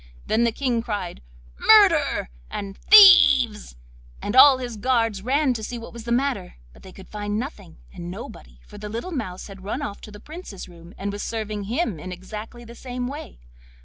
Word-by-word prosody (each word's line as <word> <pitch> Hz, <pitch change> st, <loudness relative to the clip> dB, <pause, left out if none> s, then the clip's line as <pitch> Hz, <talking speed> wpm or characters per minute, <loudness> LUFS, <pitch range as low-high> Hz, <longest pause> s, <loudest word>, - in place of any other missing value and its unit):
Then 230 Hz, +2 st, +1 dB
the 235 Hz, -, +1 dB
King 240 Hz, -1 st, -1 dB
cried 205 Hz, -, -5 dB, 0.4 s
'Murder!' 380 Hz, -, +4 dB, 0.2 s
and 200 Hz, -1 st, -6 dB
'Thieves!' 270 Hz, -, +6 dB, 0.4 s
and 205 Hz, -, -4 dB
all 265 Hz, 0 st, +8 dB
his 245 Hz, -3 st, -6 dB
guards 225 Hz, -3 st, 0 dB
ran 265 Hz, +4 st, +1 dB
to 225 Hz, -, -6 dB
see 240 Hz, +3 st, -6 dB
what 230 Hz, 0 st, -10 dB
was 235 Hz, -1 st, -10 dB
the 235 Hz, -, -4 dB
matter, 245 Hz, -, -1 dB, 0.2 s
but -, -, -18 dB
they 190 Hz, -, -13 dB
could 190 Hz, +1 st, -14 dB
find 205 Hz, 0 st, -4 dB
nothing 210 Hz, -, -7 dB, 0.2 s
and 175 Hz, -2 st, -8 dB
nobody, -, -, -10 dB
for -, -, -13 dB
the 210 Hz, 0 st, -7 dB
little 230 Hz, -, -6 dB
mouse 215 Hz, -, -5 dB
had 195 Hz, -2 st, -12 dB
run 230 Hz, +8 st, -4 dB
off 205 Hz, -7 st, -6 dB
to -, -, -11 dB
the 210 Hz, -, -12 dB
Prince's 310 Hz, -, -10 dB
room 170 Hz, 0 st, -15 dB
and 200 Hz, +1 st, -4 dB
was 205 Hz, 0 st, -6 dB
serving 215 Hz, -2 st, -4 dB
him 230 Hz, -, -2 dB
in 185 Hz, +4 st, -8 dB
exactly 210 Hz, +6 st, -9 dB
the 235 Hz, -, -12 dB
same 250 Hz, 0 st, -6 dB
way. 280 Hz, -, -9 dB
225 Hz, 195 wpm, -23 LUFS, 200-255 Hz, 0.4 s, all